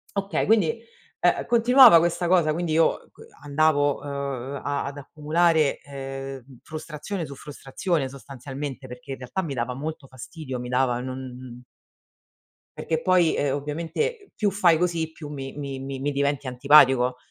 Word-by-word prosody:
Okay 200 Hz, 0 st, -1 dB
quindi, 215 Hz, -2 st, +2 dB, 0.4 s
ehm, -, -, +2 dB
continuava 240 Hz, -3 st, +7 dB
questa 170 Hz, +1 st, +1 dB
cosa, 170 Hz, -4 st, +3 dB
quindi 165 Hz, 0 st, -2 dB
io 165 Hz, +1 st, +1 dB
co -, -, -15 dB, 0.2 s
andavo, 145 Hz, -1 st, +1 dB
ehm, 140 Hz, -1 st, -5 dB
a 145 Hz, -1 st, -2 dB
ad 140 Hz, +1 st, -6 dB
accumulare, 155 Hz, +2 st, +1 dB
ehm, 135 Hz, -2 st, -8 dB
frustrazione 160 Hz, +3 st, -6 dB
su 140 Hz, -, -9 dB
frustrazione 145 Hz, +2 st, -3 dB
sostanzialmente, 135 Hz, 0 st, -8 dB
perché 125 Hz, +2 st, -10 dB
in 135 Hz, -, -4 dB
realtà 130 Hz, +9 st, -4 dB
mi 155 Hz, -7 st, -5 dB
dava 120 Hz, +1 st, -2 dB
molto 155 Hz, +3 st, -6 dB
fastidio 130 Hz, +1 st, -8 dB
mi 125 Hz, 0 st, -6 dB
dava 125 Hz, -1 st, +1 dB
e -, -, -5 dB
non 130 Hz, -1 st, -8 dB, 1.1 s
Perché 160 Hz, -1 st, -2 dB
poi, 180 Hz, -3 st, +3 dB
ehm, 140 Hz, -2 st, 0 dB
ovviamente 170 Hz, -, -3 dB
più 210 Hz, -3 st, +1 dB
fai 180 Hz, -4 st, +3 dB
così, 170 Hz, -2 st, -1 dB
più 155 Hz, -2 st, -10 dB
mi 135 Hz, -2 st, -6 dB
mi 140 Hz, -2 st, -5 dB
mi 135 Hz, 0 st, -6 dB
mi 145 Hz, +2 st, -1 dB
diventi 140 Hz, -1 st, -1 dB
antipatico 130 Hz, -1 st, +5 dB
145 Hz, 155 wpm, -24 LUFS, 135-165 Hz, 1.1 s, continuava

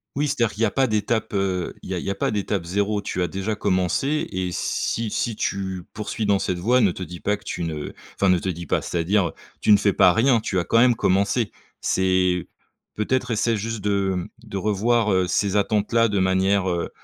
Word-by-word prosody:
Oui, 145 Hz, +2 st, +1 dB
c'est-à-dire 115 Hz, -6 st, 0 dB
qu'il 105 Hz, -, -7 dB
y -, -, +5 dB
a -, -, -3 dB
pas 135 Hz, -, +2 dB
d'étape, 110 Hz, 0 st, -1 dB
heu, 95 Hz, -3 st, -1 dB
il -, -, -10 dB
y -, -, -1 dB
a -, -, -2 dB
il -, -, -5 dB
y 100 Hz, -, -1 dB
a -, -, 0 dB
pas 100 Hz, -, -1 dB
d'étape 100 Hz, -4 st, -2 dB
0, 100 Hz, +3 st, 0 dB
tu 95 Hz, -2 st, -2 dB
as -, -, 0 dB
déjà 95 Hz, +4 st, -3 dB
commencé 105 Hz, -, 0 dB
et 90 Hz, -1 st, -2 dB
si 115 Hz, +5 st, -2 dB
si 115 Hz, +1 st, -2 dB
tu 95 Hz, -3 st, -3 dB
poursuis 110 Hz, 0 st, -4 dB
dans 100 Hz, -1 st, +4 dB
cette 90 Hz, -2 st, -2 dB
voie, 125 Hz, +8 st, +3 dB
ne 100 Hz, -5 st, +4 dB
te 90 Hz, -, -9 dB
dis 90 Hz, -1 st, -7 dB
pas 105 Hz, -, 0 dB
que 105 Hz, -, -16 dB
tu -, -, -4 dB
ne 80 Hz, -3 st, -4 dB, 0.2 s
enfin, 100 Hz, -, +2 dB
ne 90 Hz, -, +5 dB
te 85 Hz, -, -5 dB
dis 85 Hz, -2 st, -4 dB
pas -, -, 0 dB
c'est-à-dire, 90 Hz, +1 st, 0 dB, 0.3 s
tu -, -, +3 dB
ne 105 Hz, -, +8 dB
fais 100 Hz, 0 st, +2 dB
pas 90 Hz, -1 st, +5 dB
rien, 120 Hz, +3 st, +3 dB
tu 95 Hz, -3 st, -1 dB
as 85 Hz, -, -2 dB
quand 115 Hz, -, +2 dB
même 125 Hz, +1 st, +6 dB
commencé. 100 Hz, +3 st, +1 dB, 0.3 s
C'est 90 Hz, -1 st, +1 dB, 0.5 s
peut-être 125 Hz, +3 st, -1 dB
essaie 115 Hz, +1 st, +1 dB
juste 115 Hz, +1 st, -4 dB
de, 100 Hz, -1 st, +1 dB
hem, 90 Hz, -1 st, -3 dB, 0.2 s
de 100 Hz, -, -6 dB
revoir, 110 Hz, +3 st, +1 dB
heu, 95 Hz, -1 st, +2 dB
ces 95 Hz, +2 st, 0 dB
attentes-là 110 Hz, +3 st, +2 dB
de 100 Hz, -1 st, 0 dB
manière, 95 Hz, +1 st, +2 dB
heu 85 Hz, -1 st, -2 dB
100 Hz, 230 wpm, -23 LUFS, 95-110 Hz, 0.5 s, ne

